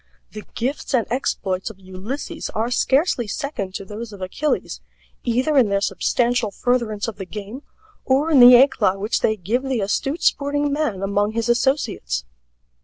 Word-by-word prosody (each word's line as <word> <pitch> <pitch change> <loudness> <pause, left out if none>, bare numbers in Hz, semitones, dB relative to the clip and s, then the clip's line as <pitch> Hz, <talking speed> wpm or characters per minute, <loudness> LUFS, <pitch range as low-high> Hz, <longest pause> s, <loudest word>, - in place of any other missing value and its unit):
The 215 - -9
gifts 265 +3 -2
and 235 - +2
exploits 195 -7 -2
of 210 -3 -13
Ulysses 200 - -6
are 225 +3 -1
scarcely 260 - +1
second 205 -7 -4
to 195 - -5
those 215 +3 -7
of 205 - -11
Achilles, 190 +11 -2 0.4
either 255 +5 +1
in 250 -6 +5
their 200 0 +1
substantial 240 +2 0
furtherance 230 -1 -1
of 220 -3 -6
the 195 - -6
game 210 +6 -7 0.4
or 280 +5 +1
in 285 - +6
the 245 0 +10
éclat 240 -7 +4
which 210 +3 -1
they 220 - +1
give 215 +7 -1
the 265 -3 -2
astute 270 - -1
sporting 290 0 +1
man 260 -11 -1
among 205 +2 0
his 230 +1 -1
associates. 240 - 0
235 Hz, 165 wpm, -21 LUFS, 200-270 Hz, 0.4 s, the